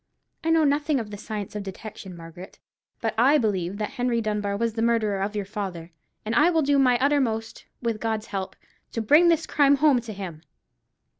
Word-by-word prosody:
I 325 - 0
know 325 -1 +4
nothing 290 0 +2
of 215 -3 -6
the 205 - -6
science 210 -1 -6
of 210 - -3
detection, 195 -1 -9
Margaret; 165 +3 -11 0.4
but 225 - -1
I 275 +5 +5
believe 195 - -1
that 210 +2 -3
Henry 245 -3 0
Dunbar 210 -2 -1
was 230 0 -1
the 225 - -3
murderer 220 -4 +1
of 205 +2 -2
your 205 -1 -2
father; 190 -5 -6 0.3
and 220 - -2
I 305 +7 +5
will 325 -3 +2
do 280 0 +3
my 250 -2 +4
uttermost, 250 -5 0 0.2
with 230 -2 -1
God's 220 -1 -2
help, 190 -3 -5 0.4
to - - -2
bring 300 +10 +6
this 330 -1 +3
crime 285 -2 +4
home 280 -3 +3
to 230 -2 -8
him." 180 -6 -7
225 Hz, 200 wpm, -25 LUFS, 200-275 Hz, 0.4 s, bring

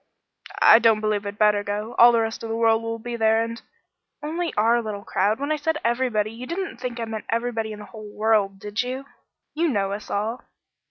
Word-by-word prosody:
"I 225 - +9
don't 225 -2 +4
believe 210 -1 -1
I'd 200 0 -6
better 210 -1 +3
go. 210 +3 -4
All 240 +1 +9
the 230 -1 +2
rest 225 0 -3
of 225 - -6
the 225 - -2
world 225 -1 +3
will 230 0 -4
be 235 +1 -6
there, 225 0 +3
and 230 0 -6 0.3
" - - -34
"Only 330 +3 -2
our 230 +3 +3
little 210 -3 -6
crowd. 205 +5 0
When 285 +2 -2
I 310 - +1
said 315 +1 -1
everybody, 235 -3 0
you 240 +3 -9
didn't 365 +2 -4
think 245 -1 -5
I 230 - -2
meant 220 -1 -6
everybody 230 -1 -1
in 210 - -7
the 210 - -10
whole 215 -2 -10
world, 210 -2 +1
did 205 +2 -3
you? 255 +2 -5 0.5
You 335 +3 +1
know 200 -8 0
us 205 +1 -6
all." 220 +4 -2
225 Hz, 225 wpm, -24 LUFS, 210-240 Hz, 0.5 s, I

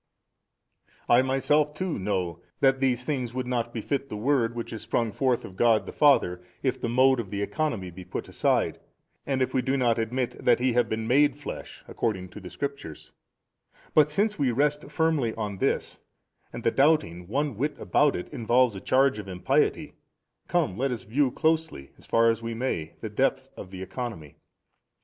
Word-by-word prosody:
I 120 +1 +6
myself 145 +3 +1
too 180 - -2
know 90 -4 -2 0.2
that 135 -1 +3
these 125 -2 +1
things 125 -4 -3
would 130 -1 -2
not 120 -2 -2
befit 135 +4 -3
the 105 - -5
Word 120 0 +1
which 115 0 -5
is 110 - -6
sprung 115 0 -1
forth 125 +2 0
of 95 - -11
God 115 +1 +3
the - - -7
Father, 110 -12 +3 0.2
if 130 -1 -1
the 120 - -1
mode 130 +2 +4
of 110 -5 -4
the 100 0 -2
Economy 110 - -2
be 90 +2 -10
put - - -6
aside - - +1
45 - - -32 0.4
and 135 -2 0
if - - -3
we 130 - +2
do 135 +2 0
not 120 -3 +2
admit 120 +2 -1
|288 - - -12
that - - +5
He 125 0 +1
have 120 -1 +2
been 110 0 -2
made 145 +4 +4
flesh 145 - -8
according 95 -5 -2
to 90 - -10
the 95 -3 -9
Scriptures: 140 - -6 0.8
but 150 -1 +5
since 205 +6 0
we 140 -3 +2
rest 145 +4 0
firmly 150 -7 +1
on 105 -3 -4
this, - - -1 0.5
and 120 - -7
the 115 - +3
doubting 135 - +2
one 140 +4 -1
whit 145 +7 -2
abont 145 -1 +2
it 90 - -6
involves 120 0 +2
a 95 - -7
charge 130 -3 +2
of 100 - -7
impiety, 90 -1 0 0.5
come 95 - 0
let 135 0 +1
us 120 - -4
view 130 +5 +1
closely, 160 - -1
as - - -18
far 115 0 +4
as 115 0 -4
we 115 0 -4
may, 85 -10 -3
the 110 - -4
depth 130 +3 0
of 95 - -9
the 95 0 -7
economy. 95 - -6
125 Hz, 195 wpm, -26 LUFS, 110-140 Hz, 0.8 s, I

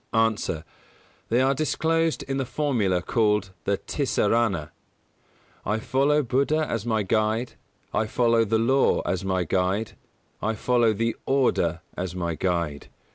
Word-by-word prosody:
_ 115 -1 +1
A. 80 -1 -4 0.6
They 120 +3 +3
are 135 +1 +3
disclosed 160 +3 0
in 135 0 -3
the 135 - -1
formula 110 -13 0
called 105 -3 +1
the 100 0 +1
Tisarana: 110 - 0 0.9
"I 105 +2 0
follow 140 +6 +2
Buddha 140 +5 +1
as 115 0 -3
my 110 -2 +1
Guide: 110 +4 0 0.4
I 110 - +1
follow 115 0 +3
the 110 +1 +1
Law 130 +5 +3
as 95 0 -2
my 95 -1 0
Guide: 95 +5 0 0.5
I 110 +1 -1
follow 120 0 +2
the 115 +2 -1
Order 90 -11 +1
as 90 0 -4
my 85 -2 -2
Guide." 85 -3 -2
110 Hz, 140 wpm, -25 LUFS, 95-130 Hz, 0.9 s, They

